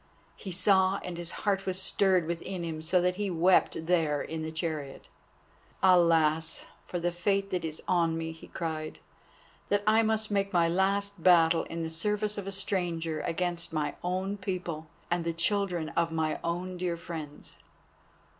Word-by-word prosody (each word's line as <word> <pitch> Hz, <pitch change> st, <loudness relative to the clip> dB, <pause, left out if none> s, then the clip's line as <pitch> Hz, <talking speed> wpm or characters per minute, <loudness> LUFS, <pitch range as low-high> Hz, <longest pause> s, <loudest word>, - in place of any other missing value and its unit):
He 195 Hz, -, -7 dB
saw 190 Hz, +1 st, +3 dB
and 180 Hz, -, -5 dB
his 170 Hz, 0 st, -4 dB, 0.2 s
heart 195 Hz, -1 st, +1 dB
was 185 Hz, 0 st, 0 dB
stirred 190 Hz, -2 st, +2 dB
within 170 Hz, +2 st, -4 dB
him, 160 Hz, -2 st, -4 dB
so 180 Hz, +3 st, +2 dB
that 180 Hz, +1 st, +1 dB
he 205 Hz, -1 st, -1 dB
wept 175 Hz, -1 st, +3 dB
there 160 Hz, -4 st, +2 dB
in 160 Hz, +2 st, -4 dB
the 160 Hz, 0 st, -4 dB
chariot. 155 Hz, -4 st, -4 dB, 0.7 s
"Alas! 165 Hz, -3 st, +4 dB, 0.2 s
for 175 Hz, -, -3 dB
the 175 Hz, +1 st, 0 dB
fate 195 Hz, +3 st, 0 dB
that 180 Hz, -2 st, -1 dB
is 160 Hz, -1 st, -4 dB
on 165 Hz, -2 st, +2 dB
me," 160 Hz, 0 st, -3 dB
he 160 Hz, -, -12 dB
cried, 155 Hz, -2 st, -4 dB, 0.7 s
"that 205 Hz, 0 st, +2 dB
I 220 Hz, +1 st, +5 dB
must 220 Hz, -1 st, +1 dB
make 200 Hz, -1 st, +1 dB
my 170 Hz, -3 st, +3 dB
last 195 Hz, +2 st, 0 dB
battle 165 Hz, -2 st, +5 dB
in 165 Hz, 0 st, -4 dB
the 160 Hz, -, -4 dB
service 210 Hz, +5 st, -1 dB
of 195 Hz, -, -6 dB
a -, -, -2 dB
stranger 175 Hz, -5 st, -2 dB
against 170 Hz, -1 st, -2 dB
my 150 Hz, -2 st, -1 dB
own 185 Hz, +3 st, -1 dB
people 180 Hz, -5 st, -4 dB, 0.2 s
and 175 Hz, -1 st, +1 dB
the 165 Hz, 0 st, -1 dB
children 175 Hz, -1 st, 0 dB
of 170 Hz, -1 st, 0 dB
my 160 Hz, -1 st, -1 dB
own 180 Hz, +2 st, -2 dB
dear 175 Hz, -1 st, -1 dB
friends." 155 Hz, -3 st, -7 dB
175 Hz, 170 wpm, -29 LUFS, 165-190 Hz, 0.7 s, I